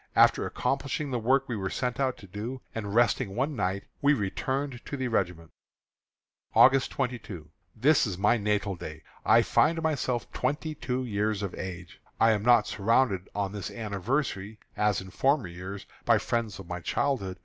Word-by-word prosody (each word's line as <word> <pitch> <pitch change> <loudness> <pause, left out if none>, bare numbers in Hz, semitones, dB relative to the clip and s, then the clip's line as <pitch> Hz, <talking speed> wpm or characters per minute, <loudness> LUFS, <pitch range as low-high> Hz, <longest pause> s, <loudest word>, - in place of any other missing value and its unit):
After - - +5
accomplishing 140 +1 -2
the 125 - 0
work 130 +4 +2
we 120 - -2
were 95 -2 -2
sent 125 0 -2
out 130 -2 +1
to - - -12
do, 110 +7 -6
and 105 -2 -4
resting 110 -4 +2
one 140 +5 0
night, 100 -2 -1 0.2
we 145 +1 +5
returned 130 +5 -2
to 140 - -4
the 130 -2 -2
regiment. 90 -7 -1 1.0
August 135 0 +6
22. 110 - -4 0.2
This 135 +3 +4
is 95 -4 -4
my 105 +4 +4
natal 105 -2 0
day. 80 -2 -8 0.2
I - - +5
find 165 +1 +3
myself 130 -7 -1
twenty 155 +2 -2
two 130 -2 -3
years 105 -2 -1
of 95 - -3
age. 90 -2 -7 0.2
I 115 - +6
am 105 -2 +1
not 120 -1 +5
surrounded 105 -2 +1
on 100 -2 -1
this 100 -3 -5
anniversary, 110 0 -2 0.2
as 105 -2 +1
in 95 0 -10
former 135 - +2
years, 95 +3 -7 0.2
by - - +5
the - - +2
friends 115 -3 -1
of 95 - -9
my 90 0 -5
childhood. 95 -2 -1
110 Hz, 175 wpm, -28 LUFS, 95-130 Hz, 1.0 s, August